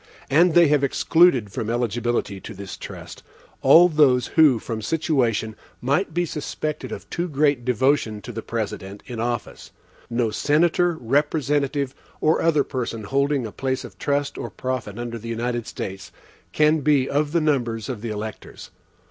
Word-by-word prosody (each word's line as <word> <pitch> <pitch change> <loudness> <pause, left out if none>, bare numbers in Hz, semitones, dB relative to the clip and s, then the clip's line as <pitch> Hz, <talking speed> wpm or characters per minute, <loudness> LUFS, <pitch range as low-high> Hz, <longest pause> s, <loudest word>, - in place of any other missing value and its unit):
And 165 +4 +4
they 170 -1 +7
have 145 -1 +3
excluded 140 - +3
from 110 +2 -4
eligibility 120 -3 -1
to 110 - -9
this 100 0 -7
trust, - - -9 0.4
all 175 +2 +7
those 145 -7 +3
who 150 -6 +5
from 110 0 -5
situation 120 -7 0 0.2
might 145 +9 0
be 175 +2 0
suspected 150 -1 -4
of - - -7
too 175 +1 -2
great 145 -3 +1
devotion 125 -2 +1
to 120 - -7
the 115 0 -5
President 105 -3 -5
in 120 -3 -7
office. 120 0 -4 0.4
No 115 -2 0
senator, 170 +7 +2
representative, 140 +1 0 0.3
or 155 +1 +2
other 155 -4 +3
person 115 -4 -4
holding 140 +4 0
a 110 - -6
place 130 +2 -2
of - - -12
trust 140 0 -1
or - - -4
profit 130 -5 -4
under 120 -1 -5
the 115 +2 -8
United 120 0 -2
States, 95 0 -6 0.4
can 155 +1 +3
be 140 -2 +2
of 145 +1 0
the 170 - +2
numbers 120 -7 0
of 125 -6 -5
the 115 - -4
electors. 105 0 -7
130 Hz, 160 wpm, -23 LUFS, 115-150 Hz, 0.4 s, they